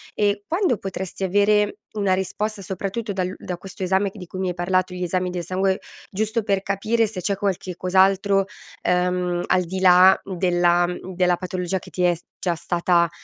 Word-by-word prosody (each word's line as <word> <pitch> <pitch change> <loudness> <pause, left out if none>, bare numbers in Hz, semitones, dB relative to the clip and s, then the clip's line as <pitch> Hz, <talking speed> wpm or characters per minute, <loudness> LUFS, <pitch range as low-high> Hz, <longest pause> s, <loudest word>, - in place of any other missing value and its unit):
Ehm, 205 -1 +1
quando 340 - +1
potresti 190 0 -5
avere 205 +2 +2 0.2
una 200 -3 +1
risposta 200 +3 -2
soprattutto 195 +4 -4
dall'u 185 -1 -2
da 180 - -5
questo 190 +1 -11
esame 190 +2 +1
che 205 - -13
di 180 - -9
cui 185 - -8
mi 185 -1 0
hai - - -2
parlato, 185 +1 0
gli 180 - -6
esami 180 +1 -1
del 175 -1 -3
sangue. 190 +2 0 0.3
Giusto 220 +2 -1
per 195 -2 +1
capire 215 +4 +1
se 205 -3 -6
c'è 200 +2 0
qualche 190 -2 -2
cos'altro, 195 +2 +3 0.4
ehm, 180 0 +1
al 185 - +3
di 185 +2 -4
là 185 0 +7
della 175 -2 +2
mhmm, 180 +1 -6
della 180 -1 +3
patologia 185 0 -3
che - - -13
ti 180 - -2
è 175 -1 +4
s 170 +1 -10 0.2
già 175 -2 0
stata, 170 +1 +1
185 Hz, 190 wpm, -23 LUFS, 180-200 Hz, 0.4 s, là